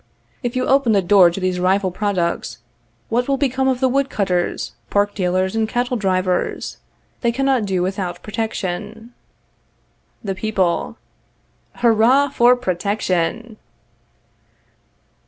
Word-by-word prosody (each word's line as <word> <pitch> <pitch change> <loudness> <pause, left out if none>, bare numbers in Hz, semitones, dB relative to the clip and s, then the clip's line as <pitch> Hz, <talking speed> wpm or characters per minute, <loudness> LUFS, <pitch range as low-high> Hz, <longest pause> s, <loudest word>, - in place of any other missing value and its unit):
If 245 -1 -3
you 255 0 0
open 270 -4 +3
the 200 - +3
doors 175 -2 +5
to - - -4
these 185 -1 -1
rival 190 +1 +1
products, 185 -3 -2 0.5
what 245 +2 0
will 275 -1 +1
become 265 -1 0
of 260 -2 +1
the 260 - +3
wood 275 +2 +1
cutters, 180 -4 -1 0.2
pork 205 0 +1
dealers, 185 +1 0
and 220 -1 0
cattle 245 +1 -1
drivers? 185 -4 -1 0.4
They 235 - +2
cannot 265 -2 +1
do 185 -2 0
without 185 -2 -3
protection. 220 +1 -4 1.1
The 195 -2 -2
People.. 190 -3 -1 0.8
Hurrah 240 +5 +4
for 245 -2 +4
PROTECTION! 205 0 -2
210 Hz, 120 wpm, -20 LUFS, 185-245 Hz, 1.1 s, doors